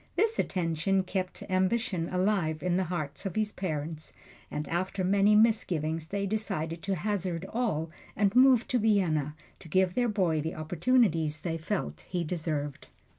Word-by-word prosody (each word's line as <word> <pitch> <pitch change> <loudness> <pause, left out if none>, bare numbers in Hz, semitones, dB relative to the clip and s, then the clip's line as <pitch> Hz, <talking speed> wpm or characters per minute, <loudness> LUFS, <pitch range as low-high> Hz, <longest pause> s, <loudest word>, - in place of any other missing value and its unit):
This 440 +4 +1
attention 180 +2 0
kept 185 0 -3
ambition 185 -1 0
alive 180 -4 0
in 180 -1 +1
the 185 0 +1
hearts 165 0 -3
of 185 - -6
his 215 -1 0
parents, 155 -4 -4 0.4
and 150 0 -4
after 185 +3 -2
many 200 +3 +4
misgivings 165 -8 +2
they 200 +3 -2
decided 190 -6 -2
to 195 -1 -1
hazard 185 -2 -2
all 185 -10 -1 0.2
and 200 +1 +1
move 255 -2 +6
to 250 - +2
Vienna 170 -9 +1 0.2
to - - -13
give 185 +2 +2
their 245 +3 +1
boy 180 -7 +1
the 160 +2 -4
opportunities 160 -2 +1
they 165 -2 -3
felt 160 - -4
he 175 -2 -1
deserved. 155 -4 -3
180 Hz, 155 wpm, -29 LUFS, 160-205 Hz, 0.4 s, move